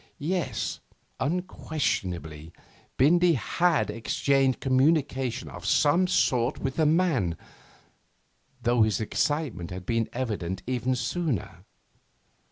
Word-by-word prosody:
Yes, 175 +3 -2 0.4
unquestionably, 95 - -2 0.5
Bindy 170 +6 +5
had 165 - +1
exchanged 135 +3 +1
communication 135 -2 +1
of 90 - -9
some 150 +11 +3
sort 125 -7 +1
with 135 -1 -3
the 155 -2 +3
man, 150 - +1 1.3
though 120 0 +3
his 110 -3 +2
excitement 115 - -1
had 90 0 -7
been 115 +1 0
evident 105 -8 -3
even 130 0 -1
sooner. 125 - -3
130 Hz, 95 wpm, -27 LUFS, 110-155 Hz, 1.3 s, Bindy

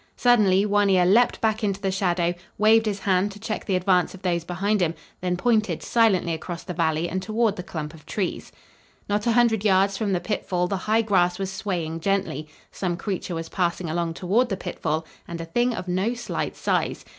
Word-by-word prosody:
Suddenly 210 -6 +4
One 205 -1 +2
Ear 185 -2 +4
leaped 225 +6 +4
back 220 0 0
into 200 -2 0
the 195 -1 -1
shadow, 175 -2 +1 0.2
waved 220 +1 +4
his 200 -2 -2
hand 190 +1 +1
to 205 - -12
check 215 0 -4
the 195 - 0
advance 185 0 +2
of 190 - -15
those 170 -2 0
behind 190 +4 0
him, 165 -1 +1 0.2
then 180 -1 -1
pointed 220 +1 +1
silently 200 -8 +2
across 170 +1 -6
the 180 - -5
valley 160 -1 0
and 185 +2 -3
toward 220 +1 0
the 180 - -5
clump 155 -3 -6
of 155 -1 -16
trees. 190 +1 -3 0.6
Not 205 +2 -1
a 235 - +3
hundred 230 -3 +3
yards 195 -1 +3
from 210 -3 0
the 180 - +1
pitfall 180 -2 -1
the 195 - -1
high 225 +1 +4
grass 180 -4 +2
was 195 -1 -3
swaying 175 -5 -3
gently; 180 -5 -1 0.2
some 175 -3 -2
creature 190 -3 -4
was 165 0 -5
passing 175 -2 -1
along 170 0 -2
toward 220 +9 +1
the 195 - -2
pitfall 160 -3 -3 0.2
and 170 0 -6
a 165 - -4
thing 240 +9 +1
of 185 - -6
no 190 +7 0
slight 240 - -4
size. - - -1
190 Hz, 205 wpm, -24 LUFS, 175-210 Hz, 0.6 s, Suddenly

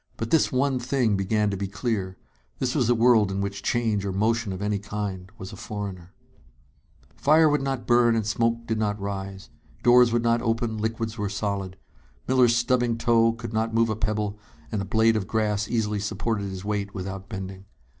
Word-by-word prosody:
But 115 - -4
this 160 - +3
one 135 0 +1
thing 125 -3 +1
began 105 +2 +1
to - - -2
be 100 +1 -3
clear: 100 -2 -3 0.4
This 130 -1 -1
was 125 -6 +1
a 120 - +4
world 115 -3 +4
in 95 - -2
which 100 0 -3
change 110 -3 0
or 100 - -2
motion 110 +2 0
of 95 - -5
any 105 0 -1
kind 100 -2 -5
was 95 - -8
a - - -7
foreigner. 95 -4 -6 1.0
Fire 155 +2 +5
would 150 -2 +2
not 135 -2 -3
burn 120 -1 +4
and 110 -2 0
smoke 115 +2 0
did 110 -1 -1
not 105 -1 -1
rise. 95 -1 -6 0.3
Doors 120 -1 +6
would 120 0 +1
not 115 0 +2
open, 115 -1 -1
liquids 110 +1 -3
were 105 -1 -1
solid. 100 -2 -3 0.5
Miller's 125 -2 +4
stubbing 120 -1 +1
toe 115 -1 +3
could 115 -1 -7
not 110 +1 -1
move 115 0 +3
a 110 - 0
pebble, 105 -1 -2 0.3
and 105 -3 -1
a - - -3
blade 110 +3 +3
of 100 -4 -2
grass 105 -2 0
easily 105 -3 0
supported 105 +1 -2
his 95 0 -7
weight 100 -1 -3
without 95 +1 -6
bending. 95 -2 -7
110 Hz, 195 wpm, -25 LUFS, 100-115 Hz, 1.0 s, Doors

